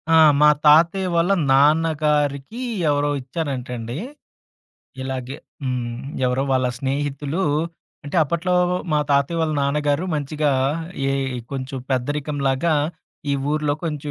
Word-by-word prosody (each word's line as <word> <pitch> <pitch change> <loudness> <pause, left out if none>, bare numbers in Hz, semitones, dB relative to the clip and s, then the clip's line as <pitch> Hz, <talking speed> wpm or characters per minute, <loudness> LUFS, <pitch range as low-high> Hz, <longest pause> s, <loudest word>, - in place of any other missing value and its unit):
ఆ! - - +7 0.2
మా 150 - +8 0.2
తాతయ్య 170 +5 +5
వాళ్ళ 170 +3 +3 0.2
నాన్నగారికి 150 - +2 0.3
ఎవరో 145 0 +1
ఇచ్చారంటండి. 125 -4 -4 1.1
ఇలాగే 130 0 -4 0.3
హ్మ్. 120 -2 -3 0.3
ఎవరో 125 +2 +1
వాళ్ళ 130 -1 +2
స్నేహితులూ 145 +4 -2 0.6
అంటే, 145 - -4
అప్పట్లో 170 +4 -1 0.2
వ్ - - +1 0.2
మా 150 - +3
తాతయ్య 140 +4 +2
వాళ్ళ 160 -1 0
నాన్నగారు 145 +3 +1
మంచిగా, 150 0 0 0.6
ఏ - - +1 0.2
ఇ - - -4
కొంచుం 135 0 -4
పెద్దరికంలాగా 145 +3 0 0.6
ఈ - - +2 0.2
ఊర్లో 150 -1 +1
కొంచెం 150 -2 -3
145 Hz, 115 wpm, -22 LUFS, 135-155 Hz, 1.1 s, మా